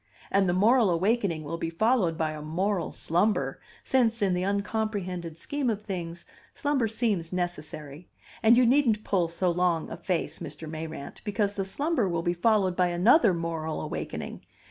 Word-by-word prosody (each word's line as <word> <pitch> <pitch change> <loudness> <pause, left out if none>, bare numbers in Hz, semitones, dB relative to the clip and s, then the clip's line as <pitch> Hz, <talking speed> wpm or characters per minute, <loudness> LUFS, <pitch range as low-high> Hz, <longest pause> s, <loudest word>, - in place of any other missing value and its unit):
And 195 -2 +3
the - - +2
moral 220 +4 +4
awakening 185 -2 +1
will 165 +3 -5
be 165 - -2
followed 185 -2 +2
by 160 -1 0
a 155 -1 -7
moral 180 +5 -1
slumber, 170 -6 0 0.2
since, 235 -3 +2
in 195 -3 +2
the 180 - 0
uncomprehended 200 -4 -2
scheme 285 +7 -1
of 210 -2 -2
things, 175 -4 -5 0.3
slumber 285 -6 +1
seems 210 -7 -1
necessary; 155 -3 -5 0.3
and 230 +1 +6
you 250 - +6
needn't 235 -4 +3
pull 180 -4 +1
so 175 +2 0
long 170 -2 0
a - - -5
face, 180 -4 -2
Mr. 160 - -7
Mayrant, 155 -2 -7
because 205 -1 0
the 195 -1 -2
slumber 280 - 0
will 170 -1 -1
be 175 - +1
followed 190 0 +2
by 180 0 +3
another 200 - +5
moral 165 -2 -3
awakening. - - -5
185 Hz, 165 wpm, -27 LUFS, 165-220 Hz, 0.3 s, and